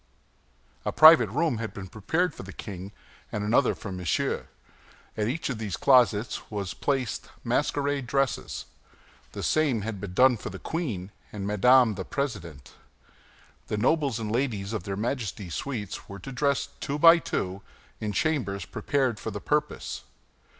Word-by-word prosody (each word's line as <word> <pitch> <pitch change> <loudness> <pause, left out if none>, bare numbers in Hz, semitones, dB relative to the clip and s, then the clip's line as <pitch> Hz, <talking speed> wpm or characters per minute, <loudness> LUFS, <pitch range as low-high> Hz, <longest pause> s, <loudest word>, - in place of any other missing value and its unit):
A - - -1
private 155 - +8
room 140 0 0
had 115 -1 -5
been 95 - -6
prepared 160 - -1
for - - -9
the 95 - -9
king 95 0 -7 0.4
and 105 - -2
another 115 +5 +3
for 100 - -7
Monsieur. 90 -3 -1 0.7
In 105 0 0
each 155 +6 -2
of 125 -5 -3
these 105 -6 -3
closets 120 -5 +3
were 105 -2 -3
placed 130 +5 -2
masquerade 140 -2 0
dresses. 135 -1 -1 0.7
The - - -5
same 145 -8 +2
had 105 -2 -5
been 95 -3 -6
done 125 +1 +6
for - - -6
the - - -7
queen 110 - -4 0.2
and 100 -2 -5
Madame 115 +4 +5
the 95 -1 -5
President. 85 - -5 0.9
The 105 - -2
nobles 135 +2 +2
and 110 -2 -3
ladies 115 -5 -1
of 105 -6 -3
their 95 -1 -3
Majesties' 105 -6 -3
suites 110 -8 -5
were 100 - -7
to 100 +8 -8
dress, 140 +1 0
two 140 - -2
by 165 +2 +8
two, 95 - -3 0.4
in 105 -1 -2
chambers 100 -5 -1
prepared 130 -6 -1
for - - -4
the 105 -1 -5
purpose. 150 +6 -2
115 Hz, 155 wpm, -27 LUFS, 100-140 Hz, 0.9 s, private